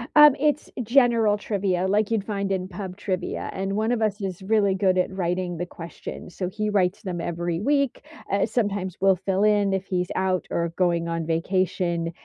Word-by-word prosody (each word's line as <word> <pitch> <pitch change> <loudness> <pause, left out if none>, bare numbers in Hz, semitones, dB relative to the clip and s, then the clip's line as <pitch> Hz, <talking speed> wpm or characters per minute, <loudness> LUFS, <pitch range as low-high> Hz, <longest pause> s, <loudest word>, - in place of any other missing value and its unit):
Um, 295 -2 +9
it's 300 0 0
general 230 -3 +4
trivia 190 -3 -1
like 210 +2 +2
you'd 220 -3 0
find 200 -2 -2
in 185 -1 -1
pub 185 0 -7
trivia, 185 -3 -3
and 195 +1 -2
one 220 +3 +1
of 235 -2 0
us 210 -1 0
is 190 -1 -4
really 200 -1 +2
good 190 -1 +2
at 180 - +1
writing 175 -1 -1
the 175 +1 -3
questions, 170 +1 -9
so 180 -1 -2
he 215 +2 -2
writes 190 +1 +1
them 175 -3 -3
every 170 0 -2
week. 280 +2 +1 0.3
Uh, 200 0 +2
sometimes 205 -5 -1
we'll 195 -1 +4
fill 190 +2 -1
in 205 -2 +3
if 190 0 -1
he's 180 -1 -1
out 185 -1 0
or 170 0 -1
going 170 -2 +1
on 165 -1 -2
vacation, 170 0 0
190 Hz, 190 wpm, -24 LUFS, 180-210 Hz, 0.3 s, Um